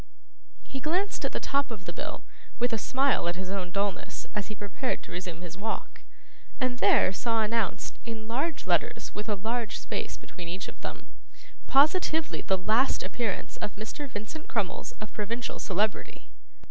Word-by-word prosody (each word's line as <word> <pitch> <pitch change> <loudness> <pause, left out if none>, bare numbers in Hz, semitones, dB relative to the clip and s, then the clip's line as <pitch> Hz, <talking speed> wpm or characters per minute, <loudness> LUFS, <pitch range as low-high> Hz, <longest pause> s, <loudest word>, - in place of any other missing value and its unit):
He 270 - -5
glanced 365 +8 +1
at - - +1
the - - -1
top 280 0 +2
of 210 -5 -6
the 175 - -4
bill, - - -4 0.3
with 245 0 +2
a 225 - +2
smile 270 -4 +3
at 175 - +1
his 185 +1 -3
own 190 -2 -1
dulness, 200 +1 -1
as 210 -2 -1
he 215 - -5
prepared 205 +6 -2
to - - -10
resume 175 -1 -4
his 180 +1 -7
walk, 220 +2 -3 0.6
and 255 -2 +1
there 195 -1 +6
saw 225 +2 +2
announced, 215 -2 0
in 225 -2 -5
large 280 +8 0
letters - - +1
with 210 +2 -4
a 210 - +3
large 220 +1 -1
space - - -3
between 175 -2 -8
each 185 +3 -3
of - - -10
them, - - -5 0.6
'Positively 315 +2 +4
the 190 - +3
last 220 +8 +3
appearance 235 -5 -2
of 205 - -3
Mr. 225 +7 -5
Vincent 225 +8 -5
Crummles 215 -6 -1
of 215 - -7
Provincial 230 +3 -2
Celebrity!!! 205 +2 0
220 Hz, 170 wpm, -30 LUFS, 195-255 Hz, 0.6 s, there